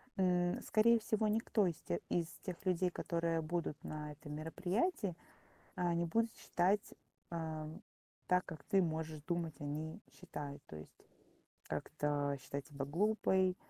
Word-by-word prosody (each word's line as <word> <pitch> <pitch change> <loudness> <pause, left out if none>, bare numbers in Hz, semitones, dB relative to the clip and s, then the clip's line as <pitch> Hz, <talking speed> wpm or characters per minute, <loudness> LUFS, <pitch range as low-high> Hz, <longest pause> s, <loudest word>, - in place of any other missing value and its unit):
м, 180 -2 +3
скорее 230 +2 +5
всего, 215 0 +1
никто 215 -2 +3
из 170 - 0
те 85 - -1
из 170 -2 +2 0.2
тех 185 +1 -5
людей, 185 0 +3
которые 170 -1 0
будут 165 -1 -2
на 150 -1 -4
этом 150 0 -8
мероприятии, 180 - 0 0.6
а, 175 -1 +2
не 170 0 +2
будут 230 +6 +2
считать, 190 +4 +1 0.4
а, 160 -2 -3 0.6
так, 180 0 +4
как 155 -4 -7
ты 195 -1 +4
можешь 160 -2 -1
думать, 170 -3 0
они 150 +2 -3
считают. 140 +1 -7
То - - -9
есть 75 - -11 0.7
как-то 145 -1 0
считать 140 +1 -4
себя 140 -2 -3
глупой, 190 +3 +3
170 Hz, 140 wpm, -37 LUFS, 150-185 Hz, 0.7 s, скорее